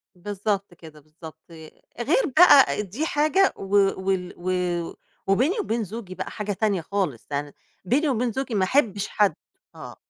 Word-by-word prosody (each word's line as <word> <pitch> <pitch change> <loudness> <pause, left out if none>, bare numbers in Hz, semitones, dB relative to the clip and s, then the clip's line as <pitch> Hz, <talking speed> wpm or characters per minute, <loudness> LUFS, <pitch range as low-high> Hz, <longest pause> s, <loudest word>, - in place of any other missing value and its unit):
بالضبط 200 0 -3
كده، 160 -3 -14
بالضبط، 160 +1 -14 0.6
غير 305 - +2
بقى 280 -10 +7
دي 220 - -4
حاجة 315 +6 +2
و - - -7 0.4
وال 190 -1 -2
و 180 -1 -2 0.3
وبيني 265 - +2
وبين 230 - -1
زوجي 200 -2 -8
بقى - - -6
حاجة 210 -1 -4
تانية 200 -3 0
خالص، 175 - -3
يعني 145 0 -4 0.3
بيني 285 - +1
وبين 245 -1 0
زوجي 265 -1 -3
ما 195 - +2
أحبش 205 -4 +1
حد 205 -2 +1 0.4
آه. - - -10
200 Hz, 150 wpm, -24 LUFS, 180-245 Hz, 0.6 s, بقى